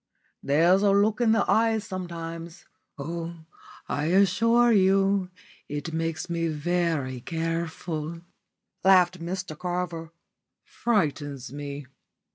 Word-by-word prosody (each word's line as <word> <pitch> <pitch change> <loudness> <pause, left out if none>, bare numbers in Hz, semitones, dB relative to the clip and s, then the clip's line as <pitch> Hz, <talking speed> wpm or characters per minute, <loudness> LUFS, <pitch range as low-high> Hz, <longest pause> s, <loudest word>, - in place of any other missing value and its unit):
"There's 170 +7 +4
a 205 - +4
look 205 +3 +3
in 230 -2 +4
the 225 -2 +2
eyes 225 -1 +2
sometimes. 170 -2 -7 0.3
Oh, 165 +3 -5 0.5
I 145 +1 -1
assure 210 +7 +4
you 195 -1 +3 0.4
it 145 +3 -4
makes 165 0 -2
me 170 -1 -1
very 155 -5 -1
careful," 165 0 -3 0.6
laughed 185 -1 +5
Mr 175 -1 -4
Carver. 175 -1 -4 0.5
"Frightens 145 - -1
me. 145 0 -6
170 Hz, 100 wpm, -26 LUFS, 160-190 Hz, 0.6 s, laughed